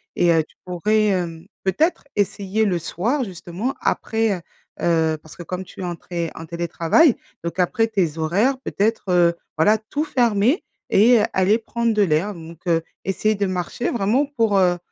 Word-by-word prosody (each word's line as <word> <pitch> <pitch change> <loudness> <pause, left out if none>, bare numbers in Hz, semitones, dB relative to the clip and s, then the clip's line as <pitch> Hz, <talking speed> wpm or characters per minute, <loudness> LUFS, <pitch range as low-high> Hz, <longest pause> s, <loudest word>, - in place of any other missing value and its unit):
et 175 -1 +3
heu, 160 -1 +3
tu - - -26
pourrais, 210 +5 +1
hem, 175 -3 -2 0.2
peut-être 305 - +1
essayer 200 +1 0
le 185 -4 +1
soir 230 - -1
justement 190 +4 -4
après, 225 -1 0
heu - - -11 0.4
heu, 160 -2 +2
parce 155 - -14
que - - -10
comme 180 +2 -5
tu - - -11
es - - -4
en 175 -1 -3
té 170 -1 -4
en 160 - -7
télétravail 170 - +2 0.3
donc 170 - -4
après 225 +5 +2
tes 180 -8 0
horaires 200 +12 +2
peut-être, 220 -4 -1
heu, 175 -1 +4 0.2
voilà 210 +8 +4
tout 285 +7 -3
fermer 240 - +2 0.3
et 230 +4 +6
aller 190 +3 +3
prendre 235 +1 -1
de 210 - +2
l'air 180 +4 +1
donc, 165 -1 -11
heu, 165 -1 +3 0.2
essayer 215 +3 +1
de 200 0 0
marcher 185 +6 -2
vraiment 235 +6 +2
pour, 225 -7 +1
heu, 180 -1 +3
195 Hz, 175 wpm, -22 LUFS, 170-225 Hz, 0.4 s, et